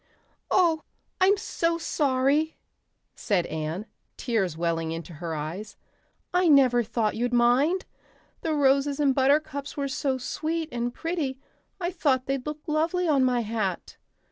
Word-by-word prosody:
"Oh, 335 -4 +3 0.4
I'm 385 +2 +5
so 335 -3 -1
sorry," 290 0 +1 0.6
said 190 -6 0
Anne, 160 +5 -4 0.3
tears 195 -10 -1
welling 165 -1 -1
into 165 +1 -6
her 160 +1 -5
eyes. 165 +8 -6 0.6
"I 360 0 +3
never 260 -5 +5
thought 225 -1 -1
you'd 240 +2 -1
mind. 255 +10 +3 0.6
The 320 -2 -1
roses 280 0 +2
and 280 -2 +3
buttercups 285 +2 +1
were 280 -1 -1
so 275 -1 -1
sweet 315 +5 -3
and 240 0 -2
pretty 295 -3 -3 0.4
I 350 -1 -1
thought 260 -7 +1
they'd 270 0 -2
look 300 0 -5
lovely 335 +3 0
on 280 -4 +3
my 250 -2 +2
hat. 215 -5 -3
270 Hz, 140 wpm, -26 LUFS, 225-310 Hz, 0.6 s, I'm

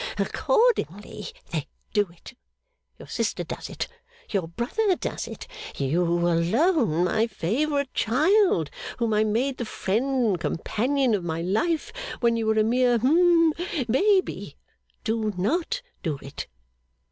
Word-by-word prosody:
'Accordingly, 440 - 0 0.2
they 155 -5 -2 0.3
do 205 -3 +2
it. 170 +7 -13 0.6
Your - - -12
sister - - -1
does - - -6
it. - - -4 0.4
Your 190 -5 0
brother 360 - 0
does - - -4
it. - - -8 0.3
You 145 +6 +1
alone, 175 - +2
my 220 +5 +2
favourite 280 - -1
child, 300 - +3 0.3
whom 230 -2 0
I 210 0 +4
made 240 +5 0
the 240 - -3
friend 245 +6 0
and 195 -6 +1
companion 250 - 0
of 200 -4 0
my 165 -1 -2
life 305 - 0 0.3
when 235 -1 +3
you 225 -1 -1
were 220 0 +2
a 215 - +5
mere 245 +2 +3
hum 330 +5 +4 0.3
Baby, 380 - +1 0.5
do 220 -2 -1
not 345 - 0 0.2
do 155 -5 -2
it. 140 - -7
230 Hz, 135 wpm, -25 LUFS, 180-295 Hz, 0.6 s, a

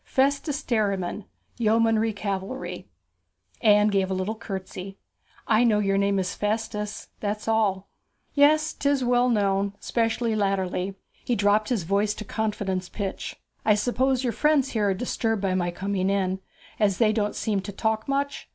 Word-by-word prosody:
Festus 280 +2 0
Derriman, 200 -4 -1 0.3
Yeomanry 225 0 +3
Cavalry.' 200 +4 -4 0.7
Anne 210 -2 +5
gave 195 -2 +1
a 190 - -1
little 185 +3 -1
curtsey. 195 -2 -7 0.5
'I 220 +1 +4
know 220 -3 +4
your 195 -1 +2
name 200 0 +2
is 185 -1 -1
Festus 210 0 -3
that's 210 +1 -3
all.' 205 -4 +1 0.5
'Yes, 305 +2 +4
'tis 280 -2 +1
well 245 0 +3
known 200 -2 +1
especially 230 -1 0
latterly.' 195 -2 -1 0.3
He 245 - 0
dropped 205 +1 +2
his 230 -8 0
voice 200 +4 +1
to 215 - -7
confidence 200 -4 -2
pitch. 200 -3 -4 0.3
'I 215 - +4
suppose 255 +4 +1
your 240 -3 0
friends 295 +1 +2
here 210 -3 +1
are 195 - +1
disturbed 225 -1 -1
by 190 -1 +1
my 180 -1 0
coming 190 +1 -1
in, 190 -1 0 0.4
as 200 -3 +2
they 215 -2 +3
don't 210 -1 -1
seem 210 -3 0
to 200 +2 -6
talk 220 +2 -1
much? 280 +1 -2
210 Hz, 155 wpm, -25 LUFS, 195-230 Hz, 0.7 s, Anne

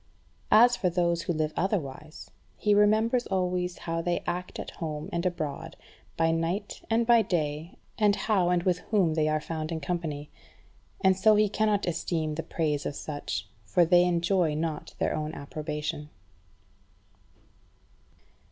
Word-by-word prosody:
As 240 +3 +7
for 185 - 0
those 170 -1 +1
who 175 - -2
live 155 -1 -1
otherwise, 155 -6 -3 0.3
he 210 - +2
remembers 220 +4 +3
always 180 -2 -1
how 165 0 -3
they 175 0 -1
act 180 +1 -4
at - - -6
home 155 -2 -5
and 170 +1 0
abroad, 160 -2 -4 0.4
by 165 0 +3
night 170 +5 -2
and 230 +1 +2
by 235 -1 +6
day, 155 -3 -2 0.2
and 205 -2 +4
how 195 -6 +1
and 175 -1 +2
with 180 -1 +1
whom 190 -7 +3
they 155 -1 +1
are 155 0 +1
found 155 +1 -5
in 165 - -2
company. 150 -2 -4 0.7
And 190 0 +4
so 215 +3 +5
he 210 0 +4
cannot 210 0 +1
esteem 165 -2 -1
the 160 - -3
praise 150 -3 -1
of - - -5
such, 145 -8 -4 0.2
for 170 - +3
they 175 +1 +5
enjoy 170 -2 +1
not 155 -1 -4
their - - 0
own 155 +1 -3
approbation. 150 0 -5
170 Hz, 150 wpm, -28 LUFS, 155-190 Hz, 0.7 s, As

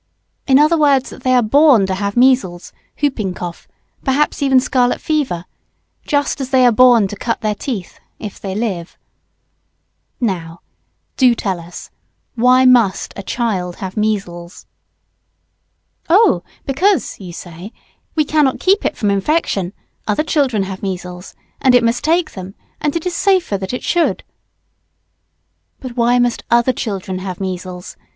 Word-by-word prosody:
in 265 -1 +5
other 305 +3 +4
words, 280 -3 +3
that - - -11
they 255 0 +2
are 245 - +4
born 270 -2 +5
to 190 - -2
have 200 +3 -3
measles, 245 -9 +2 0.2
hooping 220 -10 -1
cough, 175 -1 -7 0.4
perhaps 280 +3 0
even 270 -2 +4
scarlet 250 -1 +1
fever, 260 - -1 0.6
just 285 -1 0
as 260 - -4
they 260 -2 +4
are 245 - +6
born 235 -3 +5
to 205 - -7
cut 230 +3 -3
their 215 -1 0
teeth, 210 -4 -6 0.2
if 210 -3 -8
they 195 -1 -5
live. 195 -6 -3 1.2
Now, 175 -7 -3 0.6
do 250 -3 +4
tell 190 -5 -2
us, 170 +1 -11 0.4
why 255 +2 +4
must 240 -6 +3
a - - -6
child 190 -5 -2
have 190 -1 -7
measles? 195 -5 -3 1.4
Oh 405 +7 +4 0.2
because, 365 +9 +1
you 185 -3 -8
say, 175 +3 -10 0.4
we 305 -2 +2
cannot 295 -3 +1
keep 390 +2 +2
it - - -2
from 205 -2 +1
infection 200 - 0 0.4
other 210 +8 +1
children 270 -10 +1
have 190 0 -6
measles 180 -1 -6 0.3
and 255 -2 +5
it 245 - +4
must 230 +1 0
take 330 0 +1
them 190 0 -9 0.2
and 295 0 -1
it 335 - -3
is 360 -1 -2
safer 375 - +2
that 190 -1 -4
it 250 - -5
should. 345 -2 0 1.6
But 255 -3 -8
why 240 0 +3
must 245 -1 0
other 235 +2 +3
children 195 -5 -4
have 185 -1 -6
measles? 185 -1 -6
235 Hz, 150 wpm, -17 LUFS, 190-270 Hz, 1.6 s, are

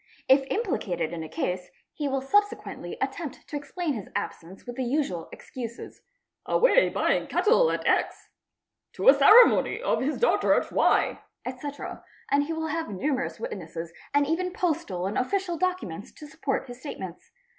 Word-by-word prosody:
If 265 +1 +6
| - - -17
implicated 175 - -1
in 165 - -4
a 160 - -7
case, 180 +2 -3 0.2
he 295 - -3
will 270 -1 -1
subsequently 410 +9 0
attempt - - -4
to 300 - -7
explain 290 +3 -3
his 215 -6 -6
absence 175 +3 -5
with 245 -1 -7
the 260 - -1
usual 240 - -1
excuses—'' 235 -2 -8 0.5
away - - +4
buying - - +1
cattle 480 +2 +4
at - - -2
X"', - - 0 0.3
"' - - -59
to - - +4
a - - +10
ceremony 450 -1 +6
of - - 0
his 285 +4 -1
daughter 480 - +3
at - - -1
Y"', - - +2 0.2
etc., 275 +3 -6 0.3
and 285 +1 +3
he 320 - -5
will 320 0 -3
have 325 +2 -2
numerous 260 +6 -2
witnesses 170 -5 -6 0.2
and 285 0 +3
even 355 +5 -1
postal 290 - -1
and 195 - -1
official 365 +6 -1
documents 335 - -3
to 305 - -11
support 290 -3 -2
his 245 0 -9
statements. 190 - -8
280 Hz, 165 wpm, -27 LUFS, -, 0.5 s, a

